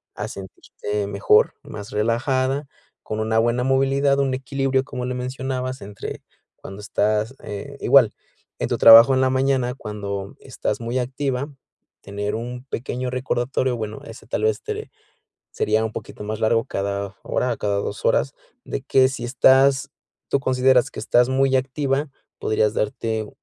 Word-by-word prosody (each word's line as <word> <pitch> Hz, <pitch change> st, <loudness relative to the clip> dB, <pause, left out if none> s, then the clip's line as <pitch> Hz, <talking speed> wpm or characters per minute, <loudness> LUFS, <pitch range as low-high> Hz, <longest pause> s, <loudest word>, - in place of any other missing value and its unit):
a -, -, -4 dB
sentirte 100 Hz, +1 st, -5 dB
mejor, 100 Hz, +1 st, +3 dB
más 105 Hz, +1 st, -8 dB
relajada, 130 Hz, +5 st, 0 dB, 0.4 s
con 110 Hz, -, -4 dB
una 110 Hz, +1 st, +1 dB
buena 120 Hz, +2 st, +1 dB
movilidad, 135 Hz, +1 st, +2 dB
un 135 Hz, -1 st, +1 dB
equilibrio, 135 Hz, 0 st, 0 dB
como 125 Hz, -1 st, -5 dB
le 125 Hz, 0 st, -3 dB
mencionabas, 130 Hz, 0 st, -4 dB
entre 100 Hz, 0 st, -7 dB, 0.4 s
cuando 95 Hz, +2 st, -10 dB
estás, 105 Hz, +3 st, 0 dB
eh, 140 Hz, +8 st, -7 dB
igual, 125 Hz, -4 st, +5 dB, 0.5 s
en -, -, -2 dB
tu -, -, 0 dB
trabajo 115 Hz, +4 st, +9 dB
en 130 Hz, -, +2 dB
la 130 Hz, -, +3 dB
mañana, 130 Hz, -1 st, +1 dB
cuando 100 Hz, -4 st, -6 dB
estás 105 Hz, -, -4 dB
muy 120 Hz, +2 st, -2 dB
activa, 130 Hz, +2 st, -2 dB, 0.5 s
tener 100 Hz, +1 st, -4 dB
un 125 Hz, +2 st, -6 dB
pequeño 125 Hz, 0 st, -4 dB
recordatorio, 130 Hz, 0 st, -1 dB
bueno, 110 Hz, -1 st, -5 dB
ese 115 Hz, -, -12 dB
tal 105 Hz, -, -2 dB
vez 110 Hz, -1 st, +1 dB
te -, -, -5 dB, 0.6 s
sería 110 Hz, +1 st, +1 dB
un 110 Hz, -, -4 dB
poquito -, -, -8 dB
más 110 Hz, +1 st, -4 dB
largo 115 Hz, +1 st, +2 dB
cada 100 Hz, 0 st, -3 dB
hora, 125 Hz, -2 st, -1 dB
cada 100 Hz, -1 st, -1 dB
2 100 Hz, -, -4 dB
horas, -, -, +2 dB, 0.3 s
de 135 Hz, -, -4 dB
que 130 Hz, -1 st, +4 dB
si 130 Hz, -2 st, -6 dB
estás, 135 Hz, +2 st, +4 dB, 0.4 s
tú 140 Hz, -, +2 dB
consideras 130 Hz, -1 st, +3 dB
que -, -, -7 dB
estás 120 Hz, +1 st, +3 dB
muy 135 Hz, 0 st, +2 dB
activa, 135 Hz, +2 st, 0 dB, 0.3 s
podrías 110 Hz, -1 st, +1 dB
darte 110 Hz, 0 st, -2 dB
125 Hz, 155 wpm, -22 LUFS, 110-130 Hz, 0.6 s, trabajo